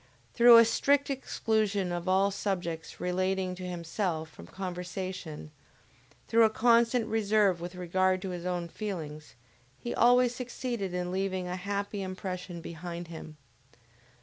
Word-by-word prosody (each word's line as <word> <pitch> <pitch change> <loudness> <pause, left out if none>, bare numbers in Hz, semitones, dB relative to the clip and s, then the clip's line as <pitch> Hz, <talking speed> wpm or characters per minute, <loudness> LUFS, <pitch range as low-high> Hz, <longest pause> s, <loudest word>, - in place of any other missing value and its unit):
Through 240 -1 +9
a 230 - +8
strict 280 +5 +2
exclusion 215 -7 0
of 175 +1 -3
all 195 +2 +3
subjects 175 -5 -3
relating 185 +1 0
to 180 0 -6
himself 170 -2 -3
from - - -12
conversation, 180 -4 -6 0.8
through 230 0 +5
a 220 - +6
constant 235 +1 +3
reserve 210 -5 +2
with 175 +1 -6
regard 185 +1 +1
to 190 - -3
his 175 -1 -5
own 175 -1 -2
feelings, 160 -6 -6 0.4
he 240 - -4
always 245 0 +4
succeeded 240 -6 -4
in 180 0 -2
leaving 190 -1 -1
a 180 - -3
happy 200 +2 -3
impression 185 -2 -5
behind 170 +1 -7
him. 160 -2 -9
185 Hz, 135 wpm, -29 LUFS, 175-215 Hz, 0.8 s, Through